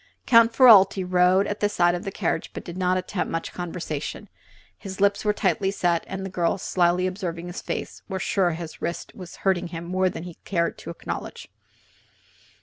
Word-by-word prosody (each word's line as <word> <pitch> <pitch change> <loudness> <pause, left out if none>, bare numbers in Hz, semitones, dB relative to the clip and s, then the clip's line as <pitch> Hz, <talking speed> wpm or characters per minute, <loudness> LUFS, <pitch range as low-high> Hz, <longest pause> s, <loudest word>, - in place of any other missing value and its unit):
Count 230 -2 +6
Ferralti 205 -6 +7
rode 180 +2 +4
at 205 0 -4
the 205 - +2
side 175 -4 +3
of 175 - -4
the 195 - -3
carriage - - -2
but - - -6
did 175 - -8
not 185 0 +1
attempt 185 +1 -3
much 165 0 -3
conversation. 165 -4 -5 0.5
His 190 -2 -9
lips 200 0 +2
were 210 - +3
tight 195 -4 0
set 175 -3 +1
and 190 0 -5
the - - -4
girls, 180 +1 0
slyly 180 0 +2
observing 180 -3 -4
his 175 +1 -6
face, - - -5
were 190 - -2
sure 190 -1 +1
his 165 -1 -8
wrist 170 - -4
was 185 -6 -10
hurting 185 -2 +2
him 170 -1 -7
much 170 - -8
more 185 0 +2
than 165 - -7
he 175 -2 -9
cared 170 -3 -1
to - - -9
acknowledge. - - -6
185 Hz, 195 wpm, -24 LUFS, 175-195 Hz, 0.5 s, Ferralti